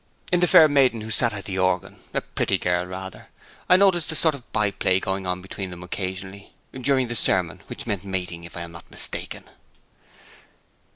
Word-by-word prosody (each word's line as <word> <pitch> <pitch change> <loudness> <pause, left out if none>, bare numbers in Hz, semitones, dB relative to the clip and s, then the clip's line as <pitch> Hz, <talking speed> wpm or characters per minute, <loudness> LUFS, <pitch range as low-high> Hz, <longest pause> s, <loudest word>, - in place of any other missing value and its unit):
'In 180 - +4
the 180 - +4
fair 160 - +8
maiden 135 -6 +3
who 110 +1 -6
sat 120 +2 +2
at 105 -2 -7
the 95 -1 -3
organ, 95 -1 0 0.2
a - - +2
pretty - - -1
girl, 90 0 0
rather. 95 +1 -8 0.4
I 180 - +8
noticed 185 -5 +3
a - - -3
sort 160 0 +3
of 135 -4 -11
by 105 -2 +1
play 95 -1 +2
going 95 0 -2
on 90 0 -2
between 95 0 -5
them 90 0 -8
occasionally, 95 +2 -6 0.2
during 130 0 +1
the 120 - -3
sermon, 90 -6 0
which - - -7
meant 100 -3 -2
mating, 90 -3 -3
if 85 - -10
I - - -4
am 85 0 -7
not 85 - -13
mistaken.' - - -5
95 Hz, 195 wpm, -24 LUFS, 90-125 Hz, 0.4 s, fair